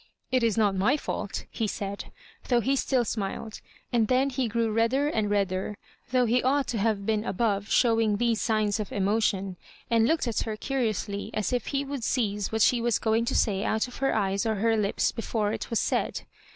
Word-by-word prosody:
" - - -47
It - - +1
is 230 -2 +1
not 210 -3 +3
my 205 +10 +2
fault," - - -4
he 225 - -1
said, 200 -1 -4 0.4
though 245 -2 +3
he 265 +5 +1
still 255 -2 +1
smiled; 215 +1 -4 0.3
and 230 -2 +3
then 260 +3 +2
he 255 -1 -1
grew 225 0 0
redder 230 +6 +2
and 215 -7 0
redder, 200 0 -1 0.3
though 250 0 +3
he 240 +2 +2
ought 275 +2 +2
to 230 - -1
have 205 -1 0
been 215 0 +1
above 205 -1 -1
showing 225 -4 +3
these 235 0 +1
signs 215 -1 +1
of 210 - -4
emotion; 195 -2 0 0.3
and 230 -1 +4
looked 320 -3 +1
at 230 - 0
her 220 -2 -3
curi 260 -1 0
ously, 205 0 -4
as 215 +2 -1
if 245 - -1
he 280 0 -1
would 275 -3 -5
seize 210 -5 0
what 220 -1 +2
she 240 0 +3
was 235 -2 +2
going 225 +1 +1
to 260 - -1
say 200 -3 +2
out 220 +2 0
of 250 - -11
her 270 -3 +1
eyes 195 -2 0
or 220 -1 0
her 225 +3 +2
lips 205 -2 +1
before 220 -2 -2
it - - -5
was 230 - +1
said. - - -1
225 Hz, 215 wpm, -27 LUFS, 205-245 Hz, 0.4 s, and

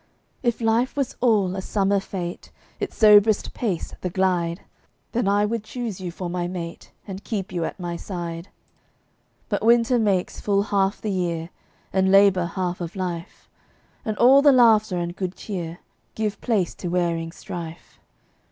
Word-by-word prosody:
If 240 -1 0
life 230 +3 +1
was 275 -3 -1
all 205 -7 +3
a 190 - -3
summer 200 0 +1
fete, 180 -3 -6 0.3
Its - - -4
soberest 210 0 +5
pace 200 -9 -3
the 180 - -2
"glide," 175 -2 0 0.5
Then 240 -3 0
I 205 +1 +3
would 225 0 -2
choose 220 -4 -5
you 180 - -4
for 180 +1 -5
my 175 0 -2
mate, 170 -2 -7 0.2
And 195 0 -7
keep 200 -4 -4
you 170 -2 -1
at - - -6
my 175 -1 -4
side. 170 -1 -6 1.0
But - - -1
winter 235 +2 +4
makes 195 -5 0
full 200 -1 +2
half 200 -1 0
the 215 - -3
year, 170 -3 -2 0.4
And 190 0 +3
labor 195 -2 +5
half 180 0 -3
of 170 +2 -5
life, 175 -3 -5 0.6
And 215 -1 -3
all 265 +3 +7
the 290 0 +7
laughter 220 -6 +5
and 175 0 -3
good 185 -1 -4
cheer 175 -5 -6 0.3
Give 215 -1 -2
place 210 -8 0
to 180 - -3
wearing 170 -2 -1
strife. 170 -1 -8
190 Hz, 160 wpm, -24 LUFS, 175-215 Hz, 1.0 s, all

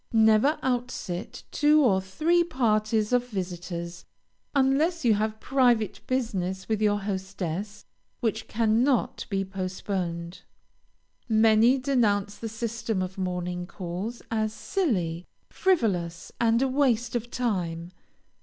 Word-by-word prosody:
Never 220 +6 +5
out 250 -1 0
sit 175 -7 -6
two 300 +1 +4
or 190 -5 +3
three 315 - +2
parties 215 -6 +1
of 245 0 +2
visitors, 175 -4 -5 0.5
unless 280 +4 +2
you 230 - +6
have 215 +1 -1
private 240 -7 +2
business 190 -7 -2
with 220 -1 -1
your 205 -1 +2
hostess 195 0 -4 0.3
which 220 -2 -2
cannot 230 +4 +1
be 195 -2 -1
postponed. 185 -2 -4 0.9
Many 220 +3 +5
denounce 215 -7 +1
the 225 - -4
system 225 -3 -2
of 185 +1 -6
morning 180 -1 -3
calls 190 +6 -5
as 215 -1 0
silly, 180 - -1 0.2
frivolous, 190 - 0
and 230 +2 +3
a - - +2
waste 255 -3 +1
of 240 0 -2
time. 180 -9 -2
215 Hz, 115 wpm, -27 LUFS, 185-245 Hz, 0.9 s, you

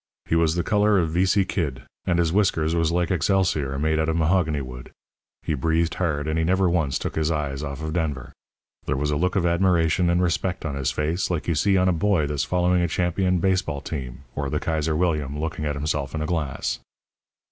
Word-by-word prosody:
He - - 0
was 85 -1 +3
the 85 - 0
colour 105 +1 +3
of 85 -4 +1
vici 95 +3 +2
kid, 70 -10 -3 0.2
and 85 -2 +2
his 85 -1 +1
whiskers 85 -6 +2
was 85 -1 +1
like 85 +2 0
excelsior 90 -6 +1
made 80 +2 +1
out 80 0 +1
of 80 - 0
mahogany 80 -2 +2
wood. 65 -1 -9 0.5
He 80 - -1
breathed 80 +3 +1
hard, 80 -5 -1
and 80 +1 0
he - - +2
never 95 +3 +2
once 80 -7 +1
took - - -4
his 80 0 0
eyes 70 -4 -2
off 70 0 -5
of 80 0 -3
Denver. 75 -7 -2 0.6
There - - 0
was 75 +2 0
a - - 0
look 90 +5 0
of 90 -3 +2
admiration 85 0 +2
and 85 +1 +2
respect 90 0 -1
on 75 - -2
his 70 -1 -1
face 75 +7 -1
like 85 -4 -2
you 85 - +2
see 95 +5 +2
on 90 0 +3
a 90 - +3
boy 85 -2 +2
that's 70 0 -1
following 90 0 +2
a 85 - +2
champion 90 +2 +1
base 95 +1 +2
ball 70 -7 -4
team, 65 -3 -6
or 70 -1 -2
the - - -1
Kaiser 80 -1 -1
William 75 -4 0
looking 80 0 -3
at 75 -1 -1
himself 75 0 -2
in 80 - -2
a - - -2
glass. 75 -5 -2
80 Hz, 225 wpm, -24 LUFS, 75-90 Hz, 0.6 s, was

